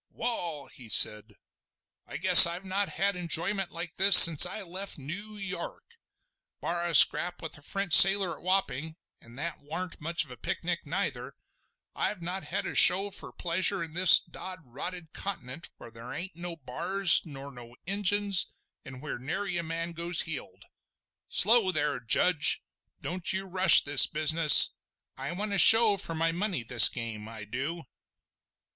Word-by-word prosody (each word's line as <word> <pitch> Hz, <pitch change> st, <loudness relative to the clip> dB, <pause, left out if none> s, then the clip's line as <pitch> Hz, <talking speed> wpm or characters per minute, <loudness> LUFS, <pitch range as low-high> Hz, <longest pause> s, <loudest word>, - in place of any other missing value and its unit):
"Wall!" 170 Hz, -, -6 dB
he 120 Hz, -3 st, -15 dB
said, 105 Hz, 0 st, +1 dB, 0.7 s
"I -, -, -9 dB
guess -, -, +7 dB
I've 175 Hz, +3 st, -9 dB
not 195 Hz, +1 st, -4 dB
had 200 Hz, 0 st, -4 dB
enjoyment 180 Hz, +2 st, -2 dB
like 170 Hz, -1 st, -8 dB
this 195 Hz, 0 st, +7 dB
since 165 Hz, 0 st, +9 dB
I 200 Hz, +3 st, -7 dB
left 190 Hz, +2 st, -6 dB
Noo 200 Hz, +10 st, -10 dB
York. 200 Hz, -, -10 dB, 0.8 s
Bar 175 Hz, 0 st, -6 dB
a 170 Hz, -, -4 dB
scrap 175 Hz, +6 st, +3 dB
with 160 Hz, -, -9 dB
a -, -, -22 dB
French 195 Hz, +3 st, -5 dB
sailor 195 Hz, -1 st, +6 dB
at -, -, -20 dB
Wapping—an' 160 Hz, -8 st, -7 dB
that 160 Hz, +4 st, -8 dB
warn't 165 Hz, +5 st, -8 dB
much 165 Hz, +2 st, -4 dB
of -, -, -19 dB
a 125 Hz, -, -13 dB
picnic 170 Hz, +6 st, -6 dB
neither—I've 195 Hz, +3 st, -8 dB
not 180 Hz, +3 st, -8 dB
had -, -, -6 dB
a -, -, -8 dB
show 195 Hz, +3 st, +4 dB
fur -, -, -9 dB
real -, -, -17 dB
pleasure 185 Hz, +2 st, -2 dB
in 160 Hz, -2 st, -12 dB
this 180 Hz, +1 st, +6 dB
dod 185 Hz, -3 st, -12 dB
rotted 160 Hz, +7 st, -11 dB
Continent, 165 Hz, -6 st, -7 dB
where 120 Hz, -, -16 dB
there 115 Hz, +1 st, -13 dB
ain't 185 Hz, 0 st, -8 dB
no 175 Hz, 0 st, -10 dB
b'ars 170 Hz, +7 st, 0 dB
nor 140 Hz, -3 st, -13 dB
no 120 Hz, -2 st, -16 dB
Injuns, 200 Hz, 0 st, 0 dB, 0.4 s
an' 130 Hz, -1 st, -14 dB
wheer 150 Hz, -4 st, -9 dB
nary 175 Hz, +6 st, -6 dB
man 165 Hz, +1 st, -7 dB
goes 170 Hz, 0 st, -3 dB
heeled. 160 Hz, -4 st, -10 dB, 0.7 s
Slow 215 Hz, -1 st, +2 dB
there, 145 Hz, -5 st, -3 dB
Judge! 145 Hz, +7 st, 0 dB, 0.4 s
Don't 180 Hz, 0 st, -6 dB
you 190 Hz, +1 st, -6 dB
rush 185 Hz, -2 st, +5 dB
this 145 Hz, -1 st, +4 dB
business! 155 Hz, 0 st, +4 dB, 0.4 s
I 135 Hz, +4 st, -9 dB
want 205 Hz, +3 st, -7 dB
a 195 Hz, -, -2 dB
show 225 Hz, +3 st, +5 dB
for 165 Hz, -3 st, -6 dB
my 165 Hz, +1 st, -1 dB
money 180 Hz, -, -5 dB
this 120 Hz, 0 st, +5 dB
game—I 110 Hz, -2 st, -10 dB
du!" 135 Hz, +10 st, -8 dB
170 Hz, 160 wpm, -25 LUFS, 145-190 Hz, 0.8 s, since